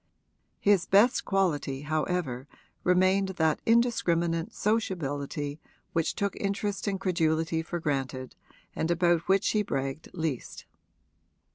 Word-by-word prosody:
His 200 -3 +3
best 210 +6 +4
quality 150 -8 0
however 150 -4 -2 0.4
remained 185 +2 +3
that 160 -1 +2
indiscriminate 175 -8 +2
sociability 145 -8 -2 0.3
which 165 -1 0
took 200 0 -1
interest 200 +1 -2
and 195 -1 -1
credulity 165 -3 +1
for 170 +2 -4
granted 135 -4 -3 0.4
and 160 - -1
about 175 -1 +2
which 195 +1 +3
he 215 - +2
bragged 135 -6 -3
least. 160 -7 -4
170 Hz, 110 wpm, -28 LUFS, 150-195 Hz, 0.4 s, best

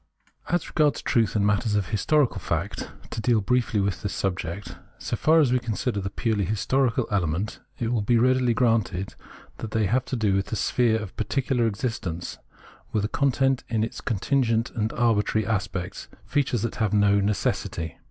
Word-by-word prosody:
As 175 -1 0
regards 150 -3 +1
truth 115 -3 +1
in 100 -1 +2
matters 105 +1 +1
of 100 -3 0
historical 135 +6 +2
fact - - -3
— - - -19
to 115 - -3
deal 115 0 +3
briefly 115 0 +1
with 100 -1 -1
this 105 - -3
subject 90 0 -3
— - - -33
so - - -3
far 160 +1 +4
as 140 -6 +4
we 125 - +3
consider 115 -2 -2
the 100 - -3
purely 110 0 0
historical 115 +5 +1
element, 95 +1 -1 0.2
it 115 - -2
will 120 -3 +1
be 115 +4 +3
readily 125 0 +3
granted 110 -6 +1 0.4
that 110 - -5
they 110 0 +1
have 125 +6 +1
to - - -3
do 110 -4 +1
with 95 0 0
the - - -3
sphere 115 +1 +2
of 105 -4 -7
particular 125 -3 0
existence, 100 -6 -4 0.5
with 105 -1 0
a - - -2
content 135 0 +1
in 110 -2 +1
its 115 - -4
contingent 115 +1 +1
and 110 -2 -1
arbitrary 110 -2 +2
aspects, 100 -2 -3 0.2
features 130 -3 0
that 115 - -3
have 110 -2 0
no 100 0 +4
necessity. 95 -5 -1
110 Hz, 180 wpm, -25 LUFS, 100-125 Hz, 0.5 s, far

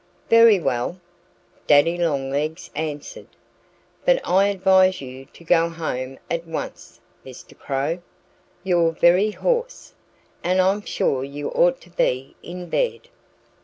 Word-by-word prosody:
"Very 230 -3 +7
well!" 125 +4 -2 0.7
Daddy 150 +4 +5
Longlegs 150 -2 -2
answered. 150 -1 -6 0.8
"But - - +3
I 195 +2 +4
advise 190 -1 +3
you 130 0 -9
to 170 - -18
go 165 0 +3
home 135 -6 -5
at 170 0 -3
once, 165 - -7 0.2
Mr. 130 -2 -13
Crow. 145 +5 -3 0.6
You're 170 -3 +2
very 180 +6 +4
hoarse. 485 - -2 0.5
And 185 +1 +1
I'm 190 +3 +2
sure 135 -9 -1
you 140 +1 -5
ought 175 0 +2
to 175 - -18
be 130 -5 -1
in 180 +1 -8
bed." 480 - -2
170 Hz, 125 wpm, -22 LUFS, 145-190 Hz, 0.8 s, Very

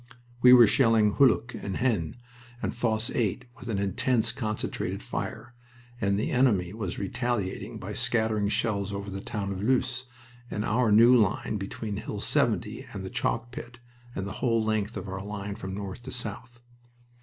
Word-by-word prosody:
We 125 - +8
were 125 -2 +10
shelling 115 -3 +4
Hulluch 130 -2 +4
and 95 -2 -4
Haisnes 110 -11 0 0.4
and - - -2
Fosse 115 -1 0
8 120 +1 -1
with 120 - -8
an 105 - 0
intense, 110 +4 +1
concentrated 110 -4 -3
fire, 120 +2 -5 0.5
and 100 -1 +2
the 105 - -1
enemy 105 -9 +2
was 105 -5 -4
retaliating 115 -1 -2
by - - -6
scattering 110 -3 +1
shells 100 -3 0
over 100 0 -5
the 95 0 -5
town 100 -2 -3
of 95 -1 -4
Loos 130 +2 +1 0.4
and 105 - -2
our 110 +1 +2
new 115 +4 +7
line 105 -1 +2
between 100 +1 -5
Hill - - -5
70 - - 0
and - - -6
the - - -6
chalk 115 - -1
pit, 120 0 -8 0.4
and 95 - -3
the 100 - -5
whole 115 -3 +2
length 110 0 -1
of - - -6
our 95 0 -5
line 100 0 -5
from 95 -1 -6
north 100 +2 -6
to - - -8
south. 120 +1 -7
110 Hz, 170 wpm, -28 LUFS, 100-120 Hz, 0.5 s, were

